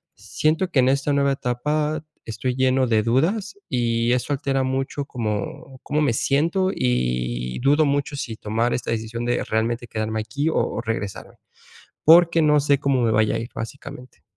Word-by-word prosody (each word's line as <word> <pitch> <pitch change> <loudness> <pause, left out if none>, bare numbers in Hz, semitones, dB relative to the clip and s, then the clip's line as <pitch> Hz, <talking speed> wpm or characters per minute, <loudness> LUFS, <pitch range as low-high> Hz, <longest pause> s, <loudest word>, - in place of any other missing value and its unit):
siento 160 +4 -1
que 135 - +2
en 130 +1 +4
esta 140 +1 +1
nueva 140 0 +2
etapa 150 +5 -2 0.2
estoy 120 +3 -3
lleno 130 0 +2
de 110 -2 +3
dudas 190 - 0
y 120 -1 +1
eso 125 +3 -1
altera 135 -1 0
mucho 135 +2 -2
cómo 120 +3 -5
cómo 150 +1 0
me 135 -6 +2
siento 170 - +1
y 60 - -1
dudo 145 +4 +4
mucho 145 0 -1
si 115 -4 -4
tomar 115 +3 -1
esta 120 - -3
decisión 115 +1 -3
de 120 0 0
realmente 115 +2 -1
quedarme 110 0 -3
aquí 140 +8 -3
o - - -2
o 115 - -1
regresarme, 110 -3 -5 0.7
porque 165 0 +6
no 150 -1 +4
sé 140 -1 +2
cómo 135 -3 +1
me 115 - +2
vaya 110 0 +2
a - - -1
ir 115 - -7
básicamente. 125 +1 -9
130 Hz, 170 wpm, -23 LUFS, 115-145 Hz, 0.7 s, porque